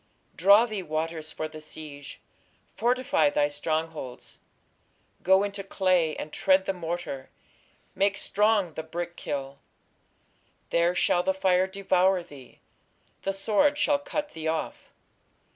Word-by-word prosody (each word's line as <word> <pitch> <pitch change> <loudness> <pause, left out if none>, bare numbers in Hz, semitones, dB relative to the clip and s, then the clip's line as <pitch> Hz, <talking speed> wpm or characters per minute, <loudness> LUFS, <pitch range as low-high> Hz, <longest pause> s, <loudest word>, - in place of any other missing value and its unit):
Draw 200 +6 +6
thee 215 -4 -4
waters 155 -1 -3
for 155 - -4
the 155 0 -10
siege, 150 -2 -9 0.6
fortify 240 - +2
thy 145 0 +2
strong 155 +2 -1
holds: 135 -6 -9 0.8
go 190 +2 +4
into 200 -1 -4
clay, 185 -5 +1
and 150 - -7
tread 190 0 +3
the 195 - 0
morter, 170 -6 -5 0.6
make 200 0 +1
strong 205 -5 +1
the 160 - -4
brick 170 +2 -5
kiln. 140 -1 -5 1.1
There 170 +1 +2
shall 175 - +3
the 190 +1 0
fire 185 -1 +2
devour 190 -1 +2
thee; 140 -7 -15 0.6
the 195 - -1
sword 215 +9 +2
shall 290 -1 +2
cut 295 +1 -4
thee 160 0 -5
off.... 160 0 -3
175 Hz, 130 wpm, -27 LUFS, 155-195 Hz, 1.1 s, Draw